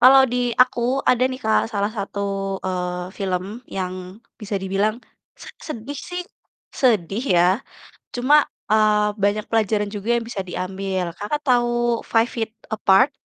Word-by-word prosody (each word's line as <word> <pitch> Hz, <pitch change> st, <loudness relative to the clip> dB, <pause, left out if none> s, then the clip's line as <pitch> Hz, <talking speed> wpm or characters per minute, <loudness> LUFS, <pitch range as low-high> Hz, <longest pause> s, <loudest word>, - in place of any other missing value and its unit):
Kalau 265 Hz, +2 st, +8 dB
di -, -, +1 dB, 0.3 s
aku 250 Hz, -1 st, -2 dB, 0.3 s
ada 250 Hz, 0 st, +2 dB
nih, 255 Hz, -, -5 dB
Kak, 220 Hz, -, +4 dB
salah 200 Hz, +1 st, +1 dB
satu, 205 Hz, -2 st, -5 dB, 0.4 s
eee, 180 Hz, -1 st, -3 dB
film 185 Hz, -2 st, -1 dB, 0.2 s
yang 185 Hz, +2 st, -6 dB, 0.2 s
bisa 210 Hz, -1 st, -5 dB
dibilang 195 Hz, +3 st, +1 dB, 0.5 s
sed -, -, -11 dB
sedih 280 Hz, +1 st, -6 dB
sih, 360 Hz, 0 st, -5 dB, 0.6 s
sedih 215 Hz, -4 st, +2 dB
ya, 175 Hz, 0 st, +5 dB, 0.7 s
cuma, 255 Hz, +5 st, +4 dB, 0.3 s
eee, 210 Hz, -1 st, +3 dB
banyak 205 Hz, +1 st, +2 dB
pelajaran 215 Hz, -2 st, +1 dB
juga 205 Hz, +2 st, -5 dB
yang 235 Hz, -, -5 dB
bisa 195 Hz, -5 st, -3 dB
diambil. 185 Hz, -1 st, -3 dB
Kakak 210 Hz, +9 st, -2 dB
tahu 240 Hz, -2 st, +2 dB
Five 225 Hz, +1 st, +2 dB
Feet 225 Hz, -2 st, -2 dB, 0.2 s
Apart? 215 Hz, +6 st, +4 dB
210 Hz, 140 wpm, -22 LUFS, 190-240 Hz, 0.7 s, Kalau